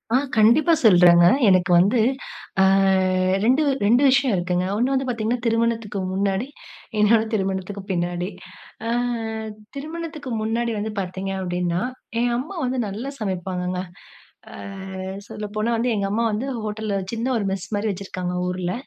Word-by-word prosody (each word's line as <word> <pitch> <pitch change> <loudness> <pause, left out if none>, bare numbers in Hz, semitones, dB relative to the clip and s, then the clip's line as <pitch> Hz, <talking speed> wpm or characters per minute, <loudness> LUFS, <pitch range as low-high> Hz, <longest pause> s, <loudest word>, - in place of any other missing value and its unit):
ஆ - - +7 0.2
கண்டிப்பா, 235 +10 +5
சொல்லுறங்க 175 -4 +7 0.2
எனக்கு 185 -1 +4
வந்து 205 +7 +3 0.6
அ - - +7 0.8
2 260 +7 +4 0.2
2 240 +6 +4
விஷயம் 265 -2 +3
இருக்குங்க. 180 0 0
ஒண்ணு 250 +4 +1
வந்து 265 0 0
பார்த்தீங்கன்னா 235 0 -1
திருமணத்துக்கு 230 -2 0
முன்னாடி. 195 +4 0 0.5
இன்னொன்னு 220 +1 +4
திருமணத்துக்கு 195 -1 -2
பின்னாடி. 175 0 -1 0.6
அ - - -1 0.9
திருமணத்துக்கு 310 0 -6
முன்னாடி 230 +2 -1
வந்து 215 +1 -3
பார்த்தீங்க 190 +1 -4
அப்படின்னா, 175 -1 -1 0.4
என் 240 0 +1
அம்மா 310 +11 -5
வந்து 255 +1 -1
நல்லா 215 +7 -5
சமைப்பாங்கங்க. 180 -2 -3 0.7
அ - - -10 0.7
சொல்ல 210 - -6
போனா 215 +2 0
வந்து 240 +2 0
எங்க 200 -1 0
அம்மா 225 +3 +1
வந்து 215 +6 -2 0.2
ஹோட்டல்லு 210 -1 -3 0.2
சின்ன 230 +1 -2
ஒரு 210 - -2
மெஸ் 190 -1 -4
மாரி 210 +2 -1
வச்சுருக்காங்க 185 -2 -4
ஊர்ல. 180 0 -2
210 Hz, 135 wpm, -23 LUFS, 185-235 Hz, 0.9 s, ஆ